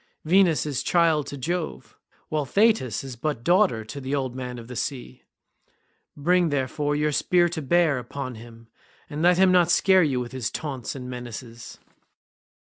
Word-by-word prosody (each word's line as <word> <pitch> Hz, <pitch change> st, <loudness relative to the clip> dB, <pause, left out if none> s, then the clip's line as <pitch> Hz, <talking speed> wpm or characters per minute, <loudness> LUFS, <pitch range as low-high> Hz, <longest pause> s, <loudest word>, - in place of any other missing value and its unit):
Venus 175 Hz, -2 st, +3 dB
is 140 Hz, -3 st, -2 dB
child 165 Hz, -3 st, +2 dB
to 140 Hz, -, -6 dB
Jove, 165 Hz, +5 st, -4 dB, 0.3 s
while 155 Hz, -1 st, 0 dB
Thetis 200 Hz, -, +2 dB
is 135 Hz, -2 st, -7 dB
but 125 Hz, -1 st, -3 dB
daughter 175 Hz, -, +2 dB
to 140 Hz, +6 st, -8 dB
the 135 Hz, +2 st, -2 dB
old 130 Hz, -3 st, -3 dB
man 125 Hz, -1 st, -5 dB
of 115 Hz, -1 st, -10 dB
the 125 Hz, -, -8 dB
sea. 130 Hz, +1 st, -5 dB, 1.0 s
Bring, 175 Hz, +3 st, +2 dB
therefore, 145 Hz, +1 st, -1 dB
your 150 Hz, +1 st, +1 dB
spear 175 Hz, +4 st, +2 dB
to 165 Hz, -1 st, -4 dB
bear 160 Hz, -2 st, +2 dB
upon 130 Hz, +1 st, -6 dB
him, 115 Hz, 0 st, -13 dB, 0.4 s
and 150 Hz, +1 st, -4 dB
let 175 Hz, +1 st, +4 dB
him 190 Hz, 0 st, +5 dB
not 175 Hz, -2 st, +4 dB
scare 190 Hz, +1 st, +4 dB
you 140 Hz, -6 st, +1 dB
with 120 Hz, -1 st, -5 dB
his 130 Hz, -4 st, -3 dB
taunts 135 Hz, -6 st, -5 dB
and 125 Hz, -2 st, -7 dB
menaces." 120 Hz, -1 st, -8 dB
145 Hz, 170 wpm, -25 LUFS, 125-170 Hz, 1.0 s, him